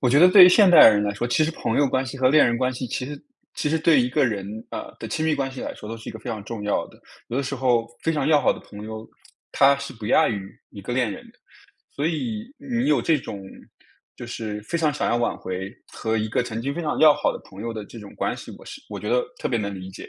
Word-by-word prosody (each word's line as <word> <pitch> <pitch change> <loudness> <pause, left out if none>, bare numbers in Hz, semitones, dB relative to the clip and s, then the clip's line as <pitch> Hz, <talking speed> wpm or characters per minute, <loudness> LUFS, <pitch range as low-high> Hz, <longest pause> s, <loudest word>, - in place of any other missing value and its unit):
我 125 - +2
觉 140 +4 +4
得 180 - +8
对 185 -1 +10
于 - - +9
现 190 0 +6
代 170 - +10
人 105 -2 +3
来 105 0 -1
说， 110 +4 -3
其 155 +5 +2
实 155 - -1
朋 115 -8 -3
友 145 - +4
关 130 0 0
系 130 - -7
和 130 0 +4
恋 155 +1 +6
人 120 - +1
关 130 +1 0
系 125 +1 -5
其 125 - -4
实 145 +2 -8 0.3
其 - - -1
实 160 +2 +1
对 160 -3 +4
一 125 - +1
个 140 +3 +2
人 100 -5 -2 0.2
呃， - - -7
的 - - -6
亲 155 - -2
密 160 - +2
关 135 -2 -2
系 130 - -8
来 - - -5
说 105 - -11
都 115 - -5
是 115 - -10
一 - - -6
个 110 - -9
非 115 - -6
常 110 -2 -5
重 110 -2 -6
要 105 - -1
的。 - - -19 0.3
有 120 - -3
的 140 - 0
时 140 +1 -4
候 120 -3 +1 0.2
非 165 - +1
常 145 -3 -1
要 150 -1 +4
好 - - +3
的 - - -10
朋 105 +1 -11
友， 110 0 -7 0.5
她 140 +1 +5
是 140 0 -7
不 110 -4 -8
亚 - - +4
于 100 -3 -6
一 100 - -10
个 100 - -6
恋 125 -4 +1
人 - - -9
的。 - - -30 0.6
所 145 - -1
以 215 +7 -3
你 245 -4 -2
有 145 -6 +2
这 160 -2 +2
种 100 -6 -8 0.7
就 120 - -8
是 110 -3 -5
非 170 +11 -3
常 155 -2 +1
想 145 - -1
要 120 - +2
挽 120 - -1
回 95 +1 -5 0.2
和 110 0 -2
一 110 0 -1
个 115 - 0
曾 115 -1 -5
经 140 +3 -3
非 175 - -3
常 155 -3 -2
要 155 -1 +8
好 - - 0
的 - - -6
朋 95 - -13
友 115 0 -4
的 110 -2 -6
这 115 - -12
种 105 -2 -12
关 - - -2
系， - - -10
我 - - -15
是 - - -10
我 - - -6
觉 105 - -6
得 125 0 +3 0.2
特 - - -2
别 120 - +1
能 100 -2 -3
理 95 0 -8
解。 95 - -10
125 Hz, 325 characters per minute, -23 LUFS, 110-150 Hz, 0.7 s, 对